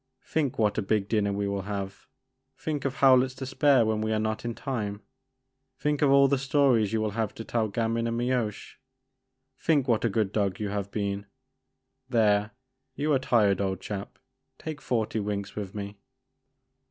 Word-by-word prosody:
Think 150 -5 -1
what 105 -1 +2
a - - +1
big 100 0 0
dinner 105 -2 +1
we 100 0 -1
will 100 0 -2
have! 100 -1 -5 0.2
' 130 0 -51
Think 150 -2 -3
of 135 0 -1
Ho 140 -2 +5
w 130 -1 +7
lett's 130 0 -5
despair 135 -1 +3
when 110 0 0
we 110 0 -1
are 110 - +2
not 110 0 -2
in 120 -1 -3
time! 105 -7 -4 0.7
Think 150 -1 0
of 145 - +4
all 140 0 +6
the 140 0 +1
stories 135 -6 +3
you 110 - +1
will 110 -1 -1
have 110 0 -2
to 115 - -6
tell 115 -1 0
to - - -10
Gamin 115 +1 0
and 115 0 -1
Mioche! 120 -4 -2 0.8
Think 145 -5 +2
what 115 -3 +2
a 115 - +2
good 105 -1 0
dog 100 -3 0
you 105 -1 -2
have 100 -1 -3
been! 100 -1 -3 0.8
There 105 -4 +3 0.3
— 130 - -49
^you 150 0 +2
are - - +2
tired 105 -7 +3
old 95 -2 -1
chap; 100 0 -6 0.4
take 155 -2 -6
forty 115 -5 -1
winks 100 -1 -3
with 100 -2 -5
me." 100 0 -6
110 Hz, 195 wpm, -27 LUFS, 100-130 Hz, 0.8 s, w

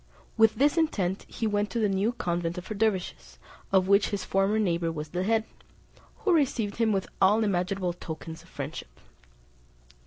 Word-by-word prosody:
With 225 -1 +5
this 290 +5 +3
intent 195 - 0
he 225 - -3
went 205 -1 0
to - - -4
the 215 - +3
new 195 +3 +1
convent 175 -5 -2
of 180 - -6
dervises, 200 -3 -2 0.3
of 190 -1 +3
which 200 +1 +4
his 200 -2 -3
former 195 +2 +1
neighbour 170 -5 +1
was 155 -1 -6
the 175 +3 -2
head, 220 +3 +2 0.8
who 380 - +4
received 245 -10 +1
him 225 -1 +2
with 195 -2 0 0.2
all 210 +4 +5
imaginable 185 -2 0
tokens 160 -1 -8
of 170 - -20
friendship. 135 - -7
195 Hz, 165 wpm, -27 LUFS, 175-220 Hz, 0.8 s, With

